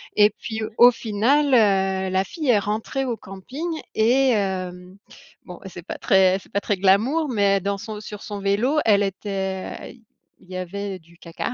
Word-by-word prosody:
et 210 0 +6
puis, 220 +1 -6 0.2
au 245 +1 +8
final, 235 +6 +1
heu, 190 -3 +2
la 190 +1 +2
fille 310 - -4
est 215 -4 +5
rentrée 220 +6 -2
au 240 -3 -2
camping 245 - -7 0.3
et 255 +5 +3
hem, 185 -3 -3 0.5
bon, 180 -1 -10
c'est 180 -2 -9
pas - - -6
très 190 -1 +4
c'est - - -21
pas 200 - 0
très 200 0 -1
glamour 220 - +2
mais 200 -4 +2
dans 200 +1 -2
son 215 0 -7
sur 210 -1 -9
son 205 -1 -6
vélo, 205 +9 +1
elle 205 -2 +4
était 195 +2 -4 0.4
il 185 - -19
y - - -6
avait 195 +1 -5
du 170 0 -22
caca, 170 -2 -5
200 Hz, 175 wpm, -23 LUFS, 190-225 Hz, 0.5 s, au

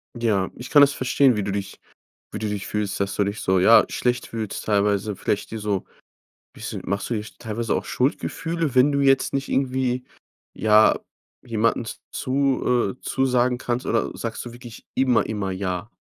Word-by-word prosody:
Ja, 105 -5 0
ich 125 - -9
kann 145 -2 +7
das 140 0 +6
verstehen, 130 -1 +3
wie 105 - 0
du 100 - -2
dich 100 -1 -5 0.5
wie - - -4
du 110 - -2
dich 105 -1 -4
fühlst 105 -2 -2
dass 100 0 -1
du 100 - +1
dich 100 +2 -3
so, 95 0 +2
ja, 115 +5 +7
schlecht 125 0 -1
fühlst 110 -3 -5
teilweise, 105 0 +1
vielleicht 105 - -2
dir 110 - -5
so 105 -3 -2 0.7
bisschen - - -6
machst 100 +2 -2
du - - 0
dir 105 -2 -2 0.2
teilweise 115 0 -2
auch - - -2
Schuldgefühle, 160 +3 -1
wenn 130 +3 +5
du 140 - +1
jetzt 135 0 +3
nicht 135 0 -1
irgendwie 130 -1 0 0.5
ja, 110 0 +4 0.4
jemanden 115 0 0
z-zu 130 -2 0
äh, - - -43
zusagen 125 -2 +1
kannst 125 0 -3
oder 115 - 0
sagst 115 -1 -4
du 120 - -7
wirklich 120 -1 -12
immer, 130 -3 +3
immer 105 -3 -3
„Ja“? 95 +2 -3
115 Hz, 180 wpm, -23 LUFS, 105-130 Hz, 0.7 s, kann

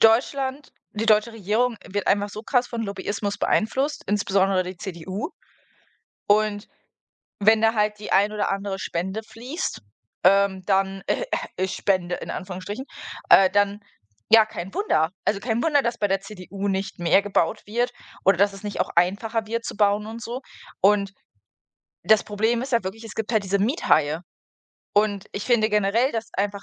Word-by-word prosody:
Deutschland 265 +5 +2 0.2
die 220 +1 -2
deutsche 215 +1 +4
Regierung 225 +3 0
wird 205 +1 -3
einfach 205 +1 +2
so 215 +2 -7
krass 250 -1 +1
von 235 -1 -3
Lobbyismus 200 0 -3
beeinflusst, 265 +10 0
insbesondere 195 -2 +2
die 180 0 -7
CDU. 190 - -5 1.0
Und 205 0 +2 0.7
wenn 215 +2 +5
da 225 +1 +4
halt 210 -1 +1
die 210 - -6
ein 205 +2 +4
oder 210 -1 -1
andere 195 0 -3
Spende 190 +5 -3
fließt, 240 - -5 0.4
ähm, 195 0 +4
dann 195 -1 +1
äh, - - 0 0.4
öh, - - +3
äh, 190 - -2
Spende 185 -3 0
in - - -7
Anführungsstrichen, 195 +7 -6 0.4
äh, 190 -1 +8
dann 205 0 +1 0.5
ja, 225 -1 +8
kein 190 -3 -7
Wunder. 160 - +1 0.2
Also, 205 - +2
kein 230 +1 -1
Wunder, 290 -3 +3
dass 235 -1 -2
bei 205 - +1
der 195 0 +1
CDU 195 0 -7
nicht 195 -1 -2
mehr 175 +3 +4
gebaut 195 -5 0
wird 240 +4 -1 0.3
oder 195 -1 +5
dass 200 +1 +4
es 195 - -12
nicht 205 -1 -4
auch - - +1
einfacher 215 +6 +1
wird 230 +1 -3
zu - - -5
bauen 205 0 +2
und 225 +1 -7
so 240 +4 -5 0.4
und 200 0 +3 0.9
das 215 +4 +5
Problem 220 +3 0
ist 260 0 -4
halt 230 - +3
wirklich, 215 +5 -5
es 220 - -9
gibt 220 +1 -3
halt 215 -2 +2
diese 195 +1 +1
Miethaie 195 - +2 0.8
und 205 -1 +1
ich 200 - -4
finde 230 -3 +3
generell, 210 +6 +2
dass 230 0 -3
einfach 200 0 -2
205 Hz, 170 wpm, -24 LUFS, 195-225 Hz, 1.0 s, äh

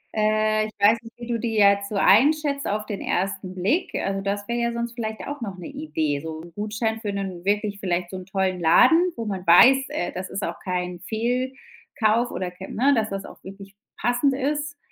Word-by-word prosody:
Äh, 215 0 +2
ich - - -11
weiß 215 +3 +5
nicht, 230 0 -13
wie 240 - -8
du 235 -1 -2
die 225 -1 -2
ja 200 -1 +7
jetzt 200 0 -2
so 210 - -5
einschätzt 280 +8 +3
auf 210 +1 -2
den 205 -2 -5
1. 185 0 -2
Blick, 210 - 0
also 195 0 -1
das 200 +1 -3
wäre 235 0 -1
ja 235 0 0
sonst 235 0 -4
vielleicht 220 -2 -5
auch 285 -2 -6
noch 195 -4 -5
'ne 180 - -9
Idee, 160 - -2
so 160 0 -6
'n 170 0 -13
Gutschein 215 +3 -2
für 205 -3 -3
'nen 190 -3 -5
wirklich 205 0 0
vielleicht 180 -2 -2
so 185 - -5
'n 185 - -10
tollen 190 -1 -1
Laden, 325 - +5
wo 230 - -5
man 190 -3 -4
weiß, 265 +10 +7
äh, 175 - -3
das 185 +1 -6
ist 195 - -4
auch - - -4
kein 180 -1 -3
Fehlkauf 245 - -2
oder 180 -1 -4
kei 185 +2 -10
ne, 275 +5 +2
dass 220 -2 0
das 195 0 -5
auch - - -13
wirklich 195 +1 -11 0.2
passend 245 +3 +2
ist, 290 +1 -2
215 Hz, 215 wpm, -24 LUFS, 190-240 Hz, 0.2 s, ja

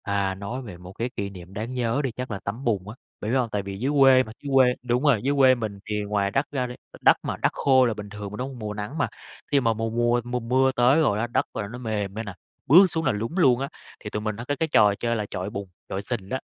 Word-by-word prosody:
À, 100 -1 0
nói 100 +7 -5
về 105 -8 -9
một 90 +1 -11
cái 115 +5 -3
kỷ 100 0 -3
niệm 90 -1 -12
đáng 110 +5 -4
nhớ 125 +2 0
đi 130 - -1
chắc 125 +1 -6
là 100 - -3
tắm 105 +7 -5
bùn 105 -5 -1
á. 110 - -8 0.3
Bạn 105 - -2
biết 135 - +3
hông? 125 -3 0
Tại 105 -1 -1
vì 100 0 -6
dưới 135 +5 0
quê 135 -1 +7
mà, 110 - -10
dưới 140 - -4
quê 125 -2 +5
đúng 125 +2 0
rồi, 135 -8 +4
dưới 140 +2 +1
quê 130 -1 +6
mình 110 -4 -5
thì 105 -1 -2
ngoài 100 -1 0
đất 135 +6 -1
ra 130 -3 -1
đi, 125 - -7 0.2
đ - - -11
đất - - +6
mà - - -3
đất - - +1
khô 130 -2 +4
là 115 - +1
bình 105 -1 -8
thường 105 -1 -7
mà, - - -6
đúng 130 +2 -3
hông? 130 -3 -10
Mùa 105 -1 -4
nắng 105 +8 -5
mà. 145 - +1 0.4
Khi 145 - +5
mà 115 -3 +2
mùa 115 +1 -2
mùa 120 +1 +1
mùa 125 +1 -2
mưa 130 +3 +2
tới 130 +4 +4
rồi 105 -9 +2
á, 120 - 0
đất 120 - 0
là 100 - -3
nó 120 +4 -8
mềm 105 -5 -3
ra 110 +2 -4
nè, 100 -3 -7 0.3
bước 175 +9 +8
xuống 160 0 -1
là 135 - +3
lún 110 +3 -3
luôn 130 -9 +5
á, 135 +1 -3 0.3
thì 105 - -7
tụi 105 - -3
mình 110 -1 -3
hay 120 - -6
có 145 - -1
cái 160 - +1
trò 105 -9 +5
chơi 115 0 0
là 105 -2 -2
chọi 90 +2 -3
bùn, 100 -1 -6 0.2
chọi 95 - -3
sình 105 -6 -3
á. 130 - -1
115 Hz, 305 wpm, -25 LUFS, 105-130 Hz, 0.4 s, bước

